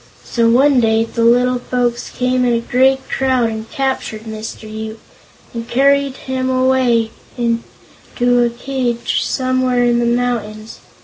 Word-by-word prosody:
So 230 -1 +1
one 265 +3 +4
day 225 -1 +2
the 230 0 -2
little 245 +2 +3
folks 245 -1 -2
came 250 0 0
in 245 -1 +2
a 230 - +2
great 265 +3 +1
crowd 260 -3 +1
and 220 0 -6
captured 265 -6 -2
Mr. 220 0 -7
Yoop, 220 +1 -7 0.5
and 230 0 -6
carried 275 +1 +2
him 260 0 -2
away 255 -3 +2 0.3
to 240 +1 -1
a 240 - +2
cage 240 -1 -2
somewhere 255 -1 0
in 240 0 +2
the 240 - +1
mountains. 230 -3 -2
245 Hz, 140 wpm, -17 LUFS, 230-255 Hz, 0.5 s, one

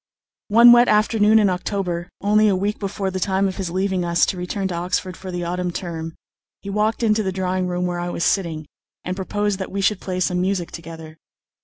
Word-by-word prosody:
One 235 +3 +8
wet 240 0 +6
afternoon 215 0 +4
in 210 -2 +4
October, 180 -1 -2
only 210 +2 +3
a 200 - +3
week 200 +3 -2
before 195 -1 -3
the 185 - -3
time 190 +1 +1
of 190 - -5
his 190 -3 -3
leaving 190 +1 -1
us 170 0 +2
to - - -2
return 185 +2 -3
to - - -3
Oxford 180 +1 -2
for 190 - -9
the 175 -1 -4
autumn 180 +1 -2
term, 165 -2 -5 0.5
he 200 - -5
walked 215 +3 0
into 215 -1 +3
the 190 -2 -2
drawing 185 0 -1
room 180 0 -2
where 175 -1 -2
I 175 0 -3
was 170 - -3
sitting, 165 -6 0 0.4
and 180 - -3
proposed 205 +1 -2
that 190 - -5
we 200 - -3
should 195 0 +1
play 185 -1 -4
some 180 0 0
music 185 -2 -1
together. 160 -1 -10
185 Hz, 215 wpm, -21 LUFS, 175-205 Hz, 0.5 s, One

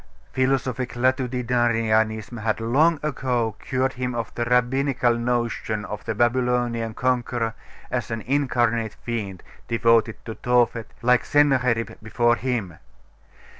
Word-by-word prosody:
Philosophic 130 -1 0
latitudinarianism 120 -3 +1
had 110 0 0
long 145 +8 +3
ago 125 -6 -1
cured 130 0 -1
him 125 -1 -3
of 115 -1 -4
the 120 - -2
Rabbinical 125 +1 +2
notion 115 -3 -1
of 105 0 -6
the 110 - -2
Babylonian 120 -1 +1
conqueror 120 -2 0 0.4
as 120 -4 -2
an 115 -1 -3
incarnate 120 -4 0
fiend, 105 -6 -4 0.2
devoted 115 -1 +3
to 110 - -5
Tophet, 120 -1 +1 0.2
like 125 0 +4
Sennacherib 130 -6 +2
before 120 +2 +2
him. 115 -10 -3
120 Hz, 115 wpm, -24 LUFS, 115-125 Hz, 0.4 s, like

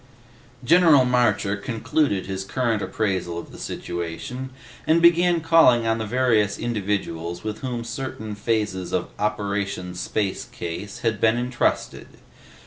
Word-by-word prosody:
General 160 -2 +6
Marcher 110 -5 +2
concluded 110 +1 -1
his 95 0 -4
current 115 0 -1
appraisal 95 -7 -2
of 85 - -7
the - - -12
situation 85 +10 -5 0.4
and 160 +1 +5
began 170 0 +4
calling 160 -8 +5
on 115 0 +1
the 110 - -3
various 110 -4 +2
individuals 95 -7 -3
with 105 -1 -4
whom 125 -3 -4
certain 115 -3 -5
phases 105 -4 -2
of 90 - -1
OPERATION 100 -3 -2
SPACE 95 +2 -2
CASE 90 +4 -6
had 115 -3 -1
been 110 +1 +4
entrusted. 125 0 -1
110 Hz, 130 wpm, -23 LUFS, 100-125 Hz, 0.4 s, General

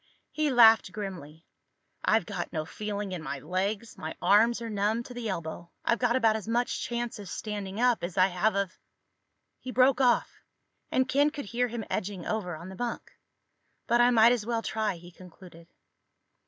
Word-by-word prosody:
He 305 -1 0
laughed 225 -6 +6
grimly. 175 -6 -7 0.6
"I've - - +3
got - - -5
no 155 -1 -3
feeling 205 +2 -5
in 180 -3 -4
my 140 -2 -4
legs. 195 - -3
My 160 - -5
arms 230 +4 +4
are 230 - -5
numb 215 +2 0
to 250 - -10
the 240 -2 -4
elbow. 170 -1 -5 0.2
I've 235 - +2
got 245 -1 +2
about 225 -4 +3
as 220 -1 -5
much 240 +2 0
chance 240 -2 -3
of 200 - -8
standing 205 -1 -5
up 245 -4 +2
as 175 +1 -5
I 185 - +6
have 195 +4 +1
of—" 200 -2 -2 0.8
He 255 - -8
broke 260 +2 +4
off, 245 -2 +2 0.5
and 260 0 +2
Ken 285 +3 +3
could 295 -4 -7
hear 240 +4 0
him 230 -2 -5
edging 190 -2 -4
over 190 -6 -2
on 170 +4 -9
the 190 - -9
bunk. 240 +3 -4 0.7
"But 240 0 +3
I 240 - +6
might 230 -1 +6
as 245 -3 +1
well 230 0 -2
try," 215 -3 -1
he 175 +1 -13
concluded. 175 -1 -15
215 Hz, 185 wpm, -28 LUFS, 185-240 Hz, 0.8 s, laughed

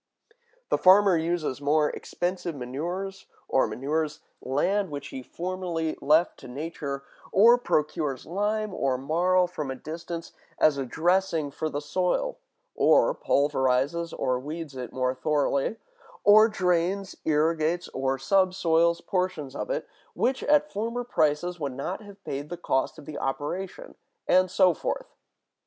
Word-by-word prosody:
The - - +2
farmer 190 0 +6
uses 160 -4 -1
more 150 +1 +2
expensive 175 -2 -3
manures, 170 +10 -5 0.2
or 135 - +2
manures 150 +3 -2 0.2
land 190 +9 0
which 140 -1 -6
he 130 - -6
formerly 170 +1 -3
left 155 +5 +3
to - - -11
nature; 140 0 -5 0.3
or 235 +5 +6
procures 150 - -1
lime 210 +3 -1
or 135 -6 0
marl 175 +7 +2
from 155 -6 -5
a 130 - -3
distance, 165 +4 -7 0.3
as 145 -3 +3
a 135 - -3
dressing 170 -1 +1
for 155 +3 -3
the 145 -1 -3
soil; 185 - -1 0.3
or - - +4
pulverizes 140 - +1
or 125 -1 -1
weeds 150 +1 -6
it 125 -2 -6
more 130 0 0
thoroughly; 140 - 0 0.5
or 215 +1 +8
drains, 185 0 0
irrigates, 160 +2 +1
or 135 0 -1
subsoils 170 +1 +2
portions 180 -7 -2
of - - -4
it, - - -2 0.3
which 260 +2 +1
at 300 0 +3
former 230 +4 -2
prices 175 -4 0
would 140 -4 -3
not 175 +10 -4
have 200 -1 -14
paid 145 +2 -5
the 175 - -5
cost 155 -2 -1
of 150 - -12
the 150 0 -6
operation; 180 - -4 0.3
and 185 0 +4
so 185 -1 +4
forth. - - -4
165 Hz, 140 wpm, -27 LUFS, 145-185 Hz, 0.5 s, or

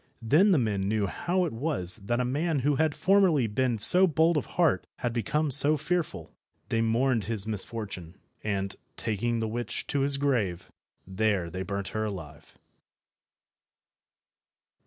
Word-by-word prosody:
Then 155 - +4
the 175 - +4
men 110 -6 -1
knew 105 +1 0
how 180 - -1
it 165 - -5
was 115 - -2
that 115 +3 -3
a 125 - 0
man 145 +3 -1
who 145 -2 +2
had 160 -1 +1
formerly 185 -9 +3
been 120 +2 -1
so 180 - +8
bold 165 +1 +2
of 150 - -2
heart 170 -4 +2
had 120 -2 -3
become 145 +6 -1
so 145 +3 +6
fearful. 165 +3 -3 0.4
They 115 - 0
mourned 115 -1 +1
his 110 -2 -3
misfortune, 100 -4 -6 0.3
and, 100 -2 -3 0.2
taking 115 +2 -2
the 110 -1 -2
witch 120 +2 -5
to 145 - -2
his 140 0 +1
grave, 120 -11 -2 0.3
there 95 -2 -1
they 95 +2 -5
burnt 100 +1 -4
her 110 0 -3
alive. 80 -8 -9
115 Hz, 155 wpm, -27 LUFS, 100-145 Hz, 0.4 s, so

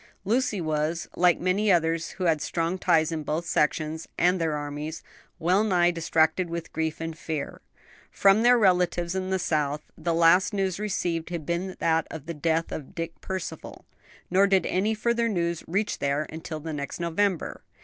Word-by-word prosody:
Lucy 230 0 +1
was, 155 +1 -1
like 180 -1 +4
many 195 +4 +2
others 165 -2 +1
who 185 - -3
had 160 -4 +2
strong 170 +3 -1
ties 160 -2 +3
in 160 -1 -2
both 155 +3 -2
sections 155 +1 0
and 180 0 +3
their 160 -2 0
armies, 150 +2 -5 0.3
well 180 +5 +2
nigh 175 -4 +3
distracted 165 +1 +1
with 170 -1 -5
grief 160 -1 -2
and 165 0 -4
fear. 155 -3 -4 0.5
From 200 +2 +4
their 245 +1 +6
relatives 180 -4 +2
in 190 0 -2
the 190 - +1
South 150 -4 0
the 170 -1 -1
last 175 +5 +4
news 190 -2 -1
received 175 -6 -2
had 170 -4 -5
been 180 +3 -2
that 160 -1 +1
of 155 -3 -8
the 170 - -4
death 160 +2 0
of 145 -4 -7
Dick 165 0 -5
Percival, 185 -4 -6 0.5
nor 195 +2 +5
did 195 -1 +3
any 210 +4 +1
further 235 +1 +1
news 170 -4 -1
reach 200 +5 -1
there 140 +2 0
until 160 0 -6
the 160 +1 -6
next 140 +1 -5
November. 170 +2 -1
170 Hz, 175 wpm, -26 LUFS, 160-185 Hz, 0.5 s, their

